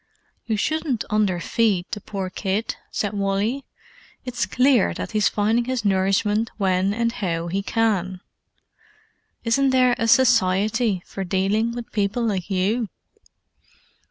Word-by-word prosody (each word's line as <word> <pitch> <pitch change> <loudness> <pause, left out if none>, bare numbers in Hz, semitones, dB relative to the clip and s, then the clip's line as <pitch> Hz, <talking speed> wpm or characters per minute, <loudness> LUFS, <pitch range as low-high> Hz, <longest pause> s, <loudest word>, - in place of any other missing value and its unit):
"You 220 -2 0
shouldn't 300 -1 -1
underfeed 205 -1 +1
the 210 - -4
poor 190 -2 -5
kid," 200 +3 -2
said 205 -1 -2
Wally. 205 +7 -1 0.6
"It's 245 -2 -2
clear 250 -4 +3
that - - -5
he's 210 -2 +2
finding 220 +3 +1
his 255 -3 -2
nourishment 200 +3 +1
when 190 -1 +1
and 230 +2 0
how 170 -6 -3
he 195 +3 -1
can. 195 -4 0 1.2
Isn't 270 +4 +2
there 255 -1 +4
a 230 - +1
Society 220 -3 +3
for 195 - -5
dealing 195 +5 0
with 240 -1 -7
people 210 +3 0
like 195 -5 -2
you?" 200 +4 0
210 Hz, 130 wpm, -23 LUFS, 195-235 Hz, 1.2 s, there